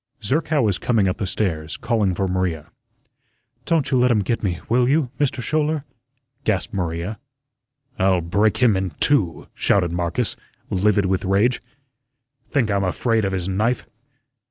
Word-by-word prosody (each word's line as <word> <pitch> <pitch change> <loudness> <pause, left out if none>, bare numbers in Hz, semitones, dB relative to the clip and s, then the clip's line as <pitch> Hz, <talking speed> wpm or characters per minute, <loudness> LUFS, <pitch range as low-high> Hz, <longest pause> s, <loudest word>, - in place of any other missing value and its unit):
Zerkow 150 +5 +1
was 100 -4 +1
coming 110 -5 +2
up 90 - -1
the 100 - -2
stairs, 80 -6 -2
calling 110 -5 0
for 95 +1 0
Maria. 90 -4 -2 0.9
"Don't 165 -5 +1
you 130 - +3
let 125 +1 +4
him 110 -4 +2
get 115 +4 -1
me, 90 -4 -1
will 125 +1 +3
you, 140 -3 +2
Mister 130 -3 0
Schouler?" 155 0 0 0.6
gasped - - -1
Maria. 90 +3 -3 0.8
"I'll 95 -1 +3
break 100 +6 +1
him 120 -5 +4
in 95 0 -1
two," 100 - +1
shouted 90 -4 +1
Marcus, 85 +7 -1 0.4
livid 100 +1 +2
with 95 0 0
rage. 100 +6 +2 0.9
"Think 125 -7 +1
I'm 100 0 +1
afraid 110 +4 +1
of 95 - -1
his 95 -2 -2
knife?" 110 +5 0
100 Hz, 155 wpm, -22 LUFS, 95-125 Hz, 0.9 s, let